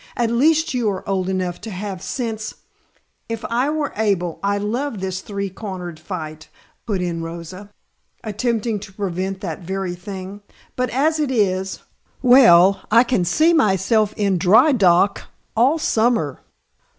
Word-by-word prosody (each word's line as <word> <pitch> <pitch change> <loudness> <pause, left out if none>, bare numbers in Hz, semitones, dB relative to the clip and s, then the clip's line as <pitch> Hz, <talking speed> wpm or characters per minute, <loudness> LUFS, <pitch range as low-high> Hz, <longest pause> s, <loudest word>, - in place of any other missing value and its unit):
"At 235 -1 +1
least 315 +6 +2
you 240 -4 +1
are 190 -2 -5
old 190 -1 -1
enough 185 -2 -2
to 225 - -7
have 190 -1 -5
sense 220 -3 -4 0.4
" - - -44 0.3
"If 230 0 -4
I 250 +4 +1
were 300 -2 -2
able 195 -6 0
I'd 200 0 0
love 235 +2 -2
this 185 0 -3
three 200 -1 -4
cornered 180 -5 -7
fight," 155 -3 -7 0.4
put 195 -5 -1
in 170 -2 -3
Rosa, 170 +4 -8 0.5
attempting 225 0 -1
to 195 - -11
prevent 190 0 -3
that 165 -5 -4
very 190 0 -3
thing. 190 +2 -8 0.3
"But 250 0 -1
as 310 +5 +1
it 295 -3 0
is 190 -6 0 0.4
well, 200 -7 +6
I 230 +3 +6
can 240 -7 0
see 310 - +3
myself 215 - +2
in 200 -3 +1
dry 220 - +5
dock 200 -4 +3 0.3
all 255 +8 +3
summer." 225 - 0
200 Hz, 150 wpm, -20 LUFS, 185-235 Hz, 0.5 s, well